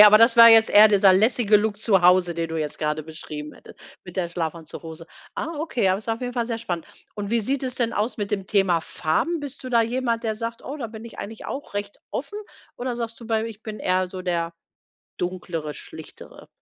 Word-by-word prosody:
Okay, - - +13
aber 210 0 +9
das 230 +1 +5
war 230 0 +11
jetzt 225 -1 +7
eher 215 +1 +8
dieser 195 -2 +5
lässige 215 +1 +4
Look 215 0 -2
zu 195 -5 +4
Hause 180 0 +4
den 165 0 -3
du 165 - -4
jetzt 150 -1 -4
gerade 150 0 -1
beschrieben 150 -1 -8
hattest - - -16 0.3
mit 180 +1 -11
der 175 -2 -1
Schlafanzughose. 165 -1 -6 0.3
Ah, 330 0 -4
okay, 255 -10 -1
aber 190 - +1
ist 220 - -11
auf 225 +2 -2
jeden 245 0 -3
Fall 235 -2 -1
sehr 230 -2 -2
spannend 180 -8 -4 0.3
und 205 -1 -5
wie 235 -1 +2
sieht 270 +5 -1
es 255 -1 -3
denn 235 -2 -1
aus 215 +6 -1
mit 205 -1 -4
dem 195 -2 -2
Thema 190 -5 +2
Farben, 160 - -1
bist 285 -2 -7
du 255 - -6
da 235 -2 +4
jemand 235 0 -1
der 220 -1 0
sagt: 230 +1 -5
„Oh, 290 +2 -6
da 235 - -3
bin 220 +1 -10
ich 235 - -11
eigentlich 220 +2 -7
auch 275 -6 -6
recht 205 0 -4
offen." 415 - -5 0.4
oder 245 -1 -3
sagst 230 0 -5
du: 230 - -10
„Bei 225 -1 0
ich 225 -1 -8
bin 215 -1 -7
eher 185 0 +1
so 185 0 -7
der 170 -2 -2 0.7
Dunklere, 175 -4 -4
Schlichtere." - - -11
210 Hz, 230 wpm, -24 LUFS, 180-230 Hz, 0.7 s, Okay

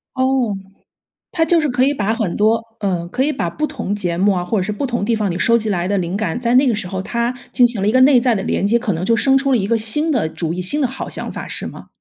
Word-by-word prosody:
哦， 260 -4 +1 0.8
它 330 - +1
就 330 +1 +3
是 310 - 0
可 250 +1 +1
以 280 - +3
把 220 -4 -1
很 220 -7 -2
多， 220 +2 +2 0.2
呃， 180 -4 -2
可 255 +9 -1
以 300 - +1
把 - - -2
不 305 - -2
同 240 -10 -4
节 180 -5 -2
目 200 +3 +3
啊， 180 - -1
或 220 - -1
者 - - -1
是 210 - -3
不 210 +7 -3
同 240 -4 -2
地 230 +2 +1
方 210 -2 -1
你 170 - -4
收 230 0 +3
集 220 -1 -2
来 180 -2 -1
的 200 0 0
灵 175 0 -2
感， 200 -1 -2
在 240 -1 0
那 265 +2 +5
个 235 - +2
时 200 -3 -5
候 190 0 -4
它 235 +4 -2 0.2
进 245 - +5
行 235 -5 -3
了 200 - +1
一 - - +3
个 255 - +3
内 260 -1 +6
在 235 -2 +2
的 195 - -2
连 195 - -1
接， 225 +4 +3
可 230 -4 -2
能 165 +2 -4
就 230 +5 +2
生 270 +3 +3
出 275 0 0
了 250 - +4
一 195 - -1
个 230 +3 +1
新 295 +9 +3
的 220 - 0
主 165 0 -3
意， 180 - -3
新 235 +12 +1
的 270 - +2
好 260 +2 -6
想 - - -5
法 - - -7
是 - - -6
吗？ - - -9
225 Hz, 335 characters per minute, -18 LUFS, 195-255 Hz, 0.8 s, 内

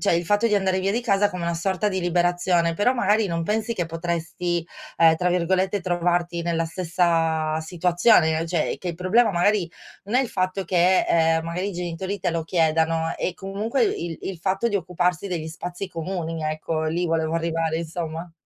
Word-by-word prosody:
cioè - - +3
il 170 +1 0
fatto 205 +5 +2
di 210 - +2
andare 190 -1 +1
via 195 +1 0
di 230 +4 0
casa 205 -4 +2
come 180 -1 -5
una 170 0 -1
sorta 190 +4 0
di 190 -2 -2
liberazione, 175 -1 +1
però 205 +8 +2
magari 220 -4 +2
non 165 -1 -2
pensi 220 +5 -1
che 180 -7 -2
potresti, 170 +1 -3 0.3
ehm, 165 -1 +6
tra 180 +2 0
virgolette, 185 +3 +1
"trovarti 175 -1 0
nella 165 -1 0
stessa 165 -2 0
situazione?" 175 +1 +3
Ehm, 165 - -2
cioè 165 -2 0
che 180 - -5
il 170 - -3
problema 210 +6 +3
magari 180 0 +1 0.3
non 210 +5 -1
è - - +5
il 255 - -4
fatto 185 0 -1
che, 185 +1 +3
ehm, 160 -1 +3
magari 180 +4 -3
i - - -5
genitori 180 +3 -4
te 175 - -1
lo 165 0 -1
chiedano, 160 -1 +1
è 185 - -2
comunque 205 - -1
il 175 - -3
il 190 -3 -5
fatto 195 +6 0
di 225 - -1
occuparsi 180 0 -1
degli 170 -4 -3
spazi 175 +4 -6
comuni, 165 -2 -4
ecco 155 +1 -2
lì 175 +3 -1
volevo 160 0 0
arrivare 165 -1 -1
insomma. 165 0 -5
175 Hz, 190 wpm, -24 LUFS, 165-190 Hz, 0.3 s, ehm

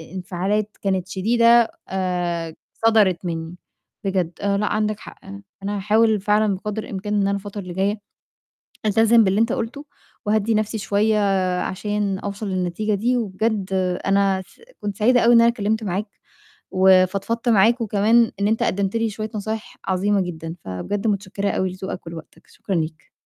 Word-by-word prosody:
انفعالات 195 +3 -2
كانت 190 -2 -1
شديدة 230 +4 +4 0.2
آآ 175 -3 -2 0.3
صدرت 200 -6 +3
منّي، 165 0 -4 0.5
بجد 185 -3 0
لأ 200 +1 +1
عندك 215 0 -1
حق، - - -12 0.4
أنا 205 +1 -2
هاحاول 215 +1 +2
فعلًا 210 -1 +2
بقدر 210 +3 -4
الإمكان 205 +1 -5
إن 205 - +2
أنا 195 0 +1
الفترة 200 +1 -4
اللي 180 -1 -8
جايّة، 200 +3 0 0.9
ألتزم 225 +2 +5
باللي 195 +2 +2
أنت 230 - +2
قُلته 260 +6 -4 0.4
وأهدّي 215 +1 +1
نَفْسي 215 +1 -1
شوية 210 +2 +1 0.4
عشان 205 0 -2
أوصل 205 +1 -5
للنتيجة 185 +3 -1
دي 240 +5 +1
وبجد 210 -2 -1 0.4
أنا 195 -1 +2
س - - -23 0.2
كنت 205 -1 -4
سعيدة 245 +3 +4
أوي 235 +1 +5
إن 230 - +7
أنا 235 - +6
كلِّمت 220 -1 -1
معاك 200 +2 -2 0.6
وفضفضت 190 +5 +3
معاك 230 +3 +4
وكمان 225 +2 +3
إن 200 - +2
أنت 225 - 0
قدّمت 200 +3 0
لي 225 -1 0
شوية 215 +1 -5
نصايح 215 +1 -5
عظيمة 195 +2 +1
جدًا، 165 -2 -5
فبجد 195 - -3
متشكّرة 200 -1 -1
أوي 185 -1 0
لذوقك 185 -2 -7
ولوقتك، 165 -1 -10
شكرًا 195 - -5
ليك. 160 -1 -3
205 Hz, 150 wpm, -22 LUFS, 190-220 Hz, 0.9 s, إن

